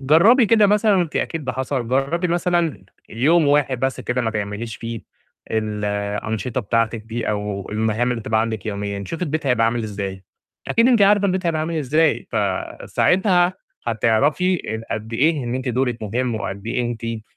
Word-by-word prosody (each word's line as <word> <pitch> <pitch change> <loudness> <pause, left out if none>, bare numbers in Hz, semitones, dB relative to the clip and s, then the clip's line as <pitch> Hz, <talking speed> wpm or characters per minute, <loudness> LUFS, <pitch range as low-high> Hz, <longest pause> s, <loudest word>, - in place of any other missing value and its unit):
جرّبي 195 - +5
كده 215 -1 +5
مثلًا 210 +1 +3
وأنتِ 175 -4 0
أكيد 165 -3 -2
ده 130 - -2
حصل، 130 -2 -2
جرّبي 140 +8 0
مثلًا 175 - 0 0.2
يوم 150 +7 +3
واحد 140 -3 +2
بس 130 0 -1
كده 125 0 -1
ما 115 - 0
تعمليش 110 +1 -4
فيه 115 -1 -6 0.5
الأنشطة 105 +2 -2
بتاعتِك 115 0 0
دي، 115 +2 -4
أو 105 -2 -3
المهام 110 +3 0
اللي 120 -2 -2
بتبقى 110 0 0
عندِك 110 -3 -3
يوميًا، 100 -1 -3
شوفي 165 - -5
البيت 155 -3 -2
هيبقى 125 -3 +3
عامل 115 +1 0
إزاي؟ 100 -3 -5 0.4
أكيد 230 +2 +4
أنتِ 235 -5 +4
عارفة 200 0 +5
البيت 185 -1 -1
هيبقى 160 -2 0
عامل 165 +2 -2
إزاي. 155 +3 +1
فساعتها 180 -1 +1 0.3
هتعرفي 125 - +2 0.3
أ - - +1
قد 110 +1 -7
إيه 145 +3 +2
إن 120 +1 -3
أنتِ 130 0 -3
دورِك 125 -1 -1
مهم، 120 +3 -1
وقد 100 -1 -5
إيه 125 +2 -1
أنتِ 115 -1 -4
125 Hz, 170 wpm, -21 LUFS, 110-165 Hz, 0.5 s, جرّبي